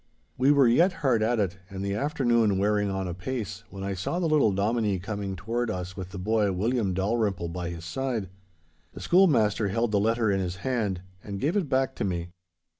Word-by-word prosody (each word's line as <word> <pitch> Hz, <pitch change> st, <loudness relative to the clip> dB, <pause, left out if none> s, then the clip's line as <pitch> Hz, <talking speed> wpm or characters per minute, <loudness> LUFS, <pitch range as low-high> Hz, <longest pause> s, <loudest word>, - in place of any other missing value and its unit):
We 130 Hz, +3 st, +4 dB
were 140 Hz, -3 st, +5 dB
yet 170 Hz, +11 st, +4 dB
hard 120 Hz, -5 st, +3 dB
at 115 Hz, +1 st, +1 dB
it, 95 Hz, -2 st, -1 dB
and 95 Hz, -1 st, -5 dB
the 100 Hz, -, -1 dB
afternoon 120 Hz, -4 st, +2 dB
wearing 105 Hz, +1 st, +1 dB
on 95 Hz, -1 st, -2 dB
apace 105 Hz, +3 st, -4 dB
when 95 Hz, 0 st, -8 dB
I 100 Hz, 0 st, -2 dB
saw 95 Hz, -, -3 dB
the 180 Hz, -, 0 dB
little 150 Hz, -8 st, +4 dB
Dominie 105 Hz, +1 st, +1 dB
coming 100 Hz, 0 st, -4 dB
toward 115 Hz, +5 st, -2 dB
us 90 Hz, -2 st, -4 dB
with 95 Hz, -2 st, -6 dB
the 95 Hz, -, -8 dB
boy 105 Hz, +1 st, +1 dB
William 100 Hz, 0 st, 0 dB
Dalrymple 100 Hz, -3 st, 0 dB
by 85 Hz, 0 st, -4 dB
his 85 Hz, -1 st, -7 dB
side. 115 Hz, 0 st, -3 dB, 0.6 s
The -, -, -9 dB
schoolmaster 115 Hz, -, +3 dB
held 115 Hz, +3 st, 0 dB
the 105 Hz, -, +3 dB
letter 110 Hz, +1 st, +2 dB
in 95 Hz, -, +1 dB
his 90 Hz, -1 st, -2 dB
hand 105 Hz, -8 st, -1 dB, 0.2 s
and 100 Hz, -1 st, -5 dB
gave 155 Hz, -, 0 dB
it 185 Hz, -9 st, 0 dB
back 130 Hz, 0 st, +1 dB
to -, -, -1 dB
me. 90 Hz, -3 st, -2 dB
105 Hz, 200 wpm, -27 LUFS, 95-120 Hz, 0.6 s, were